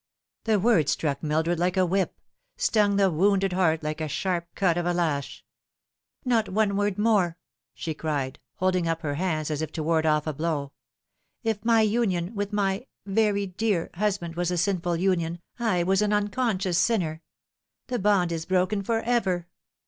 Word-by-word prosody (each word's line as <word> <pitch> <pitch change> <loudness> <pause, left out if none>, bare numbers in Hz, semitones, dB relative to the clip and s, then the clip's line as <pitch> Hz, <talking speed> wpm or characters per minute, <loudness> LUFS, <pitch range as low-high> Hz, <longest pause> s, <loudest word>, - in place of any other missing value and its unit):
The 220 -2 +3
word 185 - +3
struck 140 -3 -1
Mildred 160 +2 0
like 180 +1 0
a 185 - +4
whip 190 +2 -1 0.4
stung 215 - +2
the 195 -2 +3
wounded 195 +3 +2
heart 160 -4 +2
like 155 +1 -3
the 155 - -2
sharp 175 +2 -2
cut 180 -4 +2
of 175 0 -1
a 175 - +1
lash. 155 -5 -2 0.4
" - - -49
Not 230 -4 +2
one 200 0 +1
word 205 -1 0
more," 205 -6 +2 0.4
she 160 - -4
cried, 145 -4 -3 0.2
holding 185 -2 +1
up 165 0 -1
her 145 -3 -2
hands 155 -1 -1
as 150 0 -2
if 160 -1 -3
to 160 - -3
ward 160 0 +2
off 150 -1 +2
a 155 - -2
blow. 145 -2 -2 0.4
" - - -59 0.3
If 220 -2 -1
my 230 -1 +4
union 210 -4 +1
with 205 -1 -3
my 200 +3 -1 0.2
very 205 0 +1
dear 190 -2 -1
husband 185 -3 -1
was 175 0 0
a 180 - -1
sinful 175 -1 0
union, 170 -2 0 0.2
I 210 -7 +1
was 190 +3 +2
an 210 0 +1
unconscious 205 -4 0
sinner. 170 -9 +1 0.6
The 250 - -2
bond 195 -4 +2
is 165 -1 -4
broken 185 +2 +1
for 225 +3 0
ever. 205 -8 0
185 Hz, 180 wpm, -26 LUFS, 165-205 Hz, 0.6 s, a